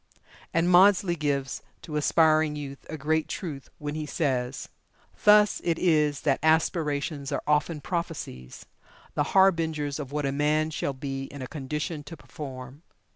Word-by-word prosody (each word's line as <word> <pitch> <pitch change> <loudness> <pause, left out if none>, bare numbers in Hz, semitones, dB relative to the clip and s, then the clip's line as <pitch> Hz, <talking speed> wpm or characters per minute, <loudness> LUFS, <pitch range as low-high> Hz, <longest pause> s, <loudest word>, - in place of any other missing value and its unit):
And 165 +1 +2
Maudsley 185 0 +5
gives 140 -4 -2 0.2
to 155 - -7
aspiring 155 0 +3
youth 140 -2 -8
a 155 - -5
great 155 +2 0
truth, 150 -8 -6
when 150 0 -5
he 155 0 -4
says: 130 -4 -1 0.6
"Thus 210 -1 +6
it 170 -2 +1
is 150 -5 +2
that 140 -3 +1
aspirations 150 -2 +1
are 140 - -2
often 150 +1 +1
prophecies, 160 - -5 0.5
the - - 0 0.2
harbingers 160 -6 +2
of 140 -2 -6
what 150 0 -1
a 135 - 0
man 150 +2 +1
shall 140 -2 -2
be 135 0 -5
in 140 -1 -8
a - - -5
condition 150 +3 -4
to 165 +2 -9
perform." 130 -1 -9
150 Hz, 150 wpm, -27 LUFS, 140-160 Hz, 0.6 s, Thus